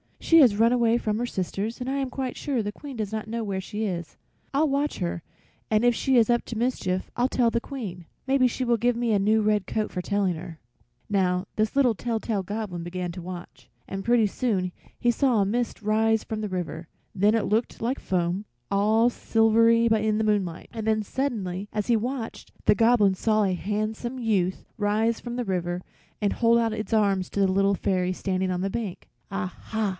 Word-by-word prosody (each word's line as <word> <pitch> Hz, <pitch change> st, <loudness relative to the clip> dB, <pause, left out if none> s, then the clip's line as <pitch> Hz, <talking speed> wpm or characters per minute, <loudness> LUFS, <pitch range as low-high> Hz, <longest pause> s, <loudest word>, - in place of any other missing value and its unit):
"She 330 Hz, -, +5 dB
has 245 Hz, -9 st, +6 dB
run 225 Hz, +3 st, +4 dB
away 235 Hz, -1 st, +3 dB
from 215 Hz, -3 st, -1 dB
her 245 Hz, -, 0 dB
sisters, 200 Hz, +1 st, -3 dB
and 250 Hz, -, -3 dB
I 275 Hz, -, -1 dB
am 270 Hz, -2 st, -1 dB
quite 260 Hz, -1 st, -4 dB
sure 265 Hz, -6 st, -1 dB
the 205 Hz, -, -3 dB
Queen 280 Hz, +5 st, -9 dB
does 215 Hz, -3 st, -3 dB
not 220 Hz, 0 st, -4 dB
know 230 Hz, +1 st, -3 dB
where 195 Hz, -3 st, -2 dB
she 210 Hz, +3 st, -4 dB
is. 175 Hz, -5 st, -4 dB, 0.4 s
I'll 300 Hz, +3 st, +3 dB
watch 285 Hz, +2 st, 0 dB
her, 170 Hz, -2 st, -3 dB, 0.5 s
and 215 Hz, +1 st, +2 dB
if 245 Hz, 0 st, +5 dB
she 265 Hz, +3 st, +1 dB
is 230 Hz, -1 st, +4 dB
up 240 Hz, 0 st, +2 dB
to 230 Hz, -, -5 dB
mischief 205 Hz, -6 st, -1 dB
I'll 245 Hz, +1 st, +3 dB
tell 245 Hz, -3 st, +2 dB
the 235 Hz, -, +1 dB
Queen. 210 Hz, -, -7 dB, 0.2 s
Maybe 265 Hz, -1 st, +4 dB
she 255 Hz, +1 st, -3 dB
will 235 Hz, -1 st, +2 dB
give 240 Hz, +2 st, +2 dB
me 235 Hz, -1 st, 0 dB
a 205 Hz, -, +3 dB
new 215 Hz, +3 st, +3 dB
red 210 Hz, -2 st, +1 dB
coat 215 Hz, -1 st, -1 dB
for 180 Hz, -, -3 dB
telling 195 Hz, -2 st, 0 dB
her." 165 Hz, 0 st, -9 dB, 0.5 s
Now, 185 Hz, -2 st, +1 dB
this 215 Hz, +3 st, +1 dB
little 265 Hz, -4 st, +4 dB
tell 225 Hz, +1 st, -2 dB
tale 210 Hz, -4 st, -2 dB
Goblin 205 Hz, -3 st, -4 dB
began 175 Hz, +1 st, -4 dB
to 180 Hz, +1 st, -7 dB
watch, 175 Hz, 0 st, -9 dB, 0.2 s
and 195 Hz, 0 st, -5 dB
pretty 235 Hz, -2 st, +4 dB
soon 200 Hz, -4 st, -1 dB, 0.3 s
he 240 Hz, -, +2 dB
saw 245 Hz, -3 st, +2 dB
a -, -, +2 dB
mist 235 Hz, +3 st, -2 dB
rise 220 Hz, +1 st, +2 dB
from 220 Hz, -1 st, -4 dB
the 210 Hz, -, -3 dB
river; 170 Hz, -3 st, -4 dB, 0.3 s
then 205 Hz, +3 st, +3 dB
it 220 Hz, -3 st, +1 dB
looked 220 Hz, +3 st, -1 dB
like 245 Hz, +4 st, -1 dB
foam, 180 Hz, +2 st, -1 dB, 0.3 s
all 215 Hz, +4 st, +4 dB
silvery, 230 Hz, 0 st, +3 dB
in 220 Hz, -1 st, +2 dB
the 220 Hz, -, +1 dB
moonlight. 200 Hz, -6 st, -1 dB
And 220 Hz, -1 st, -5 dB
then 215 Hz, -1 st, +2 dB
suddenly 205 Hz, -6 st, -3 dB
as 210 Hz, -2 st, -2 dB
he 240 Hz, -, +4 dB
watched, 240 Hz, +1 st, -4 dB
the -, -, +5 dB
goblin 225 Hz, -4 st, +4 dB
saw 215 Hz, +2 st, +2 dB
a 190 Hz, -2 st, +1 dB
handsome 215 Hz, +6 st, -3 dB
youth 200 Hz, -6 st, 0 dB
rise 220 Hz, +2 st, +1 dB
from 240 Hz, -1 st, -6 dB
the 245 Hz, -1 st, -2 dB
river 175 Hz, -2 st, -2 dB, 0.4 s
and 205 Hz, -, +1 dB
hold 235 Hz, 0 st, +4 dB
out 230 Hz, -1 st, +1 dB
his 215 Hz, +1 st, -4 dB
arms 200 Hz, -4 st, +2 dB
to -, -, -3 dB
the 195 Hz, -, +4 dB
Little 195 Hz, +1 st, +3 dB
Fairy 185 Hz, -1 st, 0 dB
standing 185 Hz, 0 st, -1 dB
on 180 Hz, -1 st, -1 dB
the 195 Hz, -, 0 dB
bank. 210 Hz, -3 st, -5 dB, 0.2 s
"Ah 185 Hz, -2 st, -3 dB
ha!" 220 Hz, -2 st, -1 dB
215 Hz, 215 wpm, -26 LUFS, 195-235 Hz, 0.5 s, has